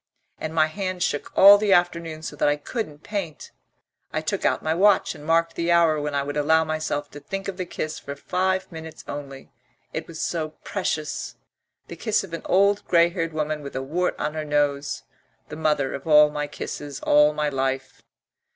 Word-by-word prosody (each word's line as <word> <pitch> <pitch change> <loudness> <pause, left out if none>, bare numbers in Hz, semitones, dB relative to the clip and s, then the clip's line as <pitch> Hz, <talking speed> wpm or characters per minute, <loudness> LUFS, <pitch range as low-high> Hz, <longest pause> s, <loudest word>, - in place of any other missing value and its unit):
And 160 +1 -5
my 155 -1 +5
hand 185 +2 -3
shook 145 - -2
all 200 +1 +10
the 205 -2 +3
afternoon 170 -2 0
so - - -5
that - - +3
I 145 - +2
couldn't 150 -1 -5
paint. 195 -9 -5 0.6
I - - -1
took - - -2
out - - +1
my 160 - +1
watch 195 +3 +3
and 145 - -12
marked 165 +2 +2
the 170 0 -1
hour 165 -3 +4
when 145 -1 -3
I 140 - +1
would 145 +1 -4
allow 160 +2 +4
myself 155 -2 -3
to 145 - -9
think 195 +6 -5
of 195 -2 -4
the 185 -2 -4
kiss 155 -2 -4
for 140 - -7
five 185 +5 -1
minutes 160 -1 -9
only 140 -2 -8 0.4
it 155 - -4
was 165 -1 -9
so 155 -2 -2
precious 155 -6 -3 0.5
the - - -8
kiss 220 -3 0
of 185 -4 -10
an 165 - -4
old 200 +2 +3
grey 170 -1 +5
haired 170 -2 -3
woman 155 -1 -2
with 140 -1 -8
a 130 - -2
wart 175 +7 -1
on 150 - -2
her 155 -1 -3
nose, 145 -1 0 0.5
the 150 - -6
mother 150 -4 0
of 140 - -7
all 150 -1 +7
my 150 0 -3
kisses 145 -1 -6
all 150 0 +5
my 150 0 -1
life. 135 -1 -2
155 Hz, 200 wpm, -24 LUFS, 145-175 Hz, 0.6 s, all